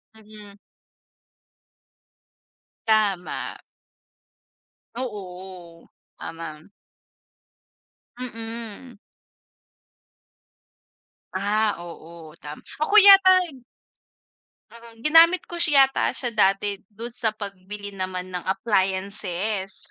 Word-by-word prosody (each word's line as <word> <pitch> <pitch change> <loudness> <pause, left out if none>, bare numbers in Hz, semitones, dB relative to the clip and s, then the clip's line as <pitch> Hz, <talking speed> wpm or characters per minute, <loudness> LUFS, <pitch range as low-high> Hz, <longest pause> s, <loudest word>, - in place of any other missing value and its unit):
Mm. 210 -2 -15 2.3
Tama. 205 -5 0 1.4
Oo, 185 -7 -8 0.3
tama. 160 0 -9 1.5
Mm. 230 -1 -8 2.4
Ah, 205 +2 0
oo 165 -2 -11
tama 150 +1 -9 0.2
ako 405 +7 +1
yata 385 -2 +9 1.3
Mm, 230 -1 -15
ginamit 330 +5 +6
ko 345 - -6
siya 280 -5 +5
yata - - -1
siya 245 - -2
dati 200 -1 +1 0.2
do'n 230 +3 -6
sa 230 -2 -1
pagbili 205 0 -7
naman 185 -1 -5
ng 180 -2 -6
appliances 195 0 -2
205 Hz, 70 wpm, -24 LUFS, 185-230 Hz, 2.4 s, yata